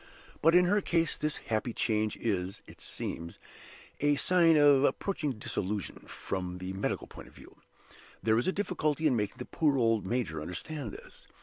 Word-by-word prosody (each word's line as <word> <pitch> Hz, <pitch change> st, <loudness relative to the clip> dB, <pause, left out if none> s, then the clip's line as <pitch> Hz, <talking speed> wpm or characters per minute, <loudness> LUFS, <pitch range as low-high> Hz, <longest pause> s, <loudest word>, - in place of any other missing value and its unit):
But 165 Hz, +2 st, +5 dB
in 180 Hz, 0 st, +7 dB
her 205 Hz, +3 st, +3 dB
case 165 Hz, -3 st, +1 dB
this 150 Hz, -1 st, -2 dB
happy 115 Hz, +1 st, -2 dB
change 110 Hz, -1 st, 0 dB
is, 95 Hz, -4 st, -2 dB
it -, -, -15 dB
seems, 85 Hz, 0 st, -5 dB, 0.6 s
a 145 Hz, 0 st, +3 dB
sign 165 Hz, +1 st, +4 dB
of 145 Hz, -2 st, +6 dB
approaching 155 Hz, -3 st, 0 dB
dissolution, 105 Hz, -2 st, -4 dB
from 90 Hz, -2 st, -4 dB
the 90 Hz, +1 st, -5 dB
medical 95 Hz, -, -2 dB
point -, -, -12 dB
of -, -, -18 dB
view. -, -, -15 dB, 0.7 s
There 110 Hz, +2 st, +3 dB
is 120 Hz, -, -1 dB
a -, -, +3 dB
difficulty 160 Hz, -6 st, -1 dB
in 140 Hz, -5 st, +4 dB
making 105 Hz, +2 st, -2 dB
the 125 Hz, -, -6 dB
poor 150 Hz, -4 st, +1 dB
old, 115 Hz, -3 st, +2 dB
major 95 Hz, -8 st, -2 dB
understand 110 Hz, -, -5 dB
this. -, -, -12 dB
125 Hz, 175 wpm, -30 LUFS, 100-155 Hz, 0.7 s, in